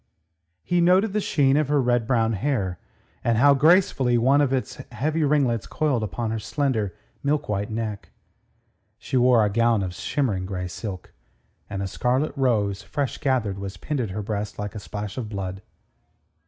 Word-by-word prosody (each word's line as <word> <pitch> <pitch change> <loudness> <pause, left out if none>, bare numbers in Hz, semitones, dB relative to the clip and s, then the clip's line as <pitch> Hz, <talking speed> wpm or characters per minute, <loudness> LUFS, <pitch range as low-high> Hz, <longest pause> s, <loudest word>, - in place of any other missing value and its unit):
He 175 0 +1
noted 185 +4 +4
the 210 - +1
sheen 140 -7 +2
of 150 -2 +2
her 145 0 +2
red 120 -3 +1
brown 115 -3 +2
hair, 100 -5 -1 0.4
and 115 -1 +2
how 140 +4 +6
gracefully 140 -5 +4
one 135 +5 +4
of 140 -3 +1
its 130 -1 -2
heavy 155 +7 -1
ringlets 140 -7 +1
coiled 145 -6 0
upon 110 +1 -3
her 110 - -2
slender, 110 - -1 0.3
milk 145 +1 0
white 105 +1 -2
neck. 110 -2 -4 0.9
She - - -5
wore 125 -3 +5
a - - +1
gown 115 -1 +2
of 90 -1 -4
shimmering 100 - -1
grey 90 -2 -4
silk, 95 0 -7 0.6
and 100 -1 -3
a - - -2
scarlet 130 +9 0
rose, 110 -8 +1
fresh 140 -3 -3
gathered, 120 -9 0
was 100 -1 -6
pinned 145 - -3
at 110 - -2
her 105 +3 -4
breast 105 0 -4
like 105 0 -4
a 110 - -6
splash 105 +2 -6
of 110 -4 -5
blood. 95 -2 -5
115 Hz, 175 wpm, -24 LUFS, 105-140 Hz, 0.9 s, how